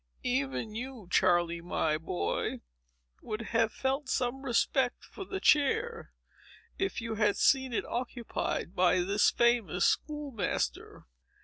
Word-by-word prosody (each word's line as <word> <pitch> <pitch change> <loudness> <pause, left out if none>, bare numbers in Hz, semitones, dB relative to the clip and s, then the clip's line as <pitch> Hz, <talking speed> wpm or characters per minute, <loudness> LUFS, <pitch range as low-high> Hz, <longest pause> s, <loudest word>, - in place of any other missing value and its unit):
Even 135 - -1
you, 240 -3 -6
Charley, 175 -2 +3
my 160 -3 0
boy, 90 - -2 0.6
would 215 +1 -4
have 225 -1 +3
felt 270 +1 -2
some 250 +2 -1
respect 260 0 +1
for 390 - -9
the 385 +1 -4
chair, 420 - +2 0.7
if 385 -9 -1
you 230 -1 -3
had 210 -2 +2
seen 265 -2 +3
it 230 - -1
occupied 240 -6 -3
by 180 0 +4
this 200 +3 +3
famous 235 -7 +2
school 295 -2 0
master." 205 -7 -3
230 Hz, 125 wpm, -30 LUFS, 180-265 Hz, 0.7 s, by